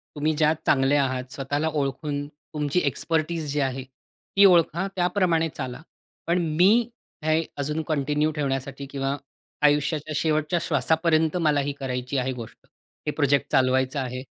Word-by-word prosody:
तुम्ही 155 +1 +1
ज्यात 155 0 +3
चांगले 135 +1 +3
आहात 130 -2 0
स्वतःला 145 +3 -1
ओळखून 145 0 -2
तुमची 150 +1 -3
एक्सपेर्टीज 155 +2 -1
जी 145 - -1
आहे 135 -1 -1
ती 135 +9 -1
ओळखा, 175 0 +4
त्याप्रमाणे 175 -3 +1
चाला. 130 0 -5 0.5
पण 170 +1 +2 0.2
मी 220 +7 +5 0.3
हे 155 +1 +2
अजून 150 +3 -1
कंटिन्यू 150 0 +1
ठेवण्यासाठी 135 -2 -3
किंवा 135 0 -2 0.5
आयुष्याच्या 150 +1 +2
शेवटच्या 155 +2 +1
श्वासापर्यंत 160 +2 +2
मला 150 -4 +2
ही 140 +1 -2
करायची 125 0 -3
आहे 130 0 0
गोष्ट. 115 -3 -9 0.5
हे - - +2
प्रोजेक्ट 145 -2 +1
चालवायचं 130 +2 +2
आहे. 130 -1 -4
145 Hz, 140 wpm, -25 LUFS, 135-160 Hz, 0.5 s, मी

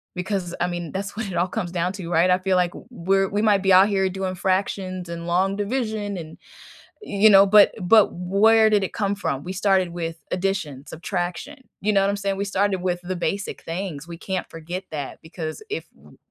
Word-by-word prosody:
because, 180 -1 -3
I 175 - +2
mean, 175 -2 -5
that's 200 +1 -4
what 225 -1 -3
it 190 - -6
all 175 - +2
comes 180 -2 -4
down 180 +1 -1
to, 185 -4 -7
right? 170 +2 +3
I 180 - +5
feel 190 0 +1
like 180 -1 +2
w - - -12
we're 195 -3 +1
we 205 +1 -1
might 210 -3 +3
be 190 -1 +3
out 190 +3 +7
here 195 -1 +1
doing 185 0 -3
fractions 185 -1 -2
and 170 0 -6
long 190 +3 +1
division 210 -2 -2
and, 160 -2 -9 0.6
you 215 - +4
know, 195 0 +8
but 205 0 +6
but 210 +4 +5
where 215 +5 +4
did 210 -2 +3
it - - -7
come 200 -1 -1
from? 140 -8 -3
We 180 - -5
started 190 -1 +2
with 165 -1 -5
addition, 180 -8 -2
subtraction. 180 - -5
You 215 - +1
know 195 -2 +3
what 195 - +2
I'm 200 - 0
saying? 200 -1 -2
We 200 - -2
started 195 -1 0
with 180 -1 -1
the 180 0 -4
basic 195 +4 -3
things. 165 -3 -5
We 170 -1 -8
can't 185 0 -4
forget 170 +4 -6
that 145 -3 -5
because 160 - -6
if 425 - -5
w - - -19
190 Hz, 215 wpm, -23 LUFS, 175-200 Hz, 0.6 s, know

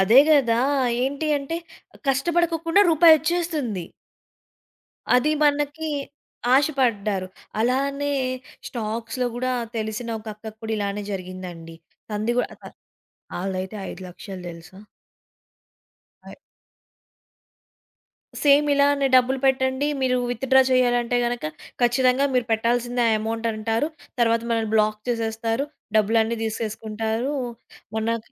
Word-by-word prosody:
అదే 220 +8 +7
కదా! 240 -6 +4 0.4
ఏంటి 285 +4 -1
అంటే 280 +4 -4 0.5
కష్టపడకోకుండా 330 +5 +2
రూపాయోచ్చేస్తుంది. 315 - +3 1.3
అది 300 +5 +2
మనకి 295 +2 +1 0.7
ఆశపడ్డారు. 225 -9 +1 0.3
అలానే 280 +4 0 0.6
స్టాక్స్‌లో 230 +2 -3
గూడా 255 +1 -1 0.2
తెలిసిన 220 +2 -3
ఒక 220 - -20
అక్కకి 220 0 -10
కూడా 220 0 -2
ఇలానే 200 0 -2
జరిగిందండి. 180 -3 -7 0.4
తంది 215 +3 0
గూ 245 - +4
అ - - -22
అ - - -14 0.7
ఆల్డయితే 190 +1 -3
5,00,000 185 +1 -9
తెలుసా? 170 +3 -12 1.5
ఐ - - -9 2.1
సేమ్ 290 +1 +6
ఇలానే 280 0 +3
డబ్బులు 255 +1 +4
పెట్టండి 260 +1 +2
మీరు 255 -1 +2
విత్‌డ్రా 265 +2 +3
చేయాలంటే 245 -1 +2
గనక 240 -6 -2 0.4
ఖచ్చితంగా 255 +3 +3
మీరు 250 -2 +2
పెట్టాల్సిందే 240 +2 +1
ఆ - - +3
ఎమౌంట్ 225 +1 -3
అంటారు. 225 +6 -1 0.3
తర్వాత 230 0 +3
మనల్ని 225 -2 0
బ్లాక్ 215 0 +2
చేసేస్తారు. 225 +2 -1 0.3
డబ్బులన్నీ 225 +2 +2
తీసేసుకుంటారూ. 220 +3 -3 0.6
మొన్న 225 +1 0
235 Hz, 100 wpm, -23 LUFS, 220-275 Hz, 2.1 s, అదే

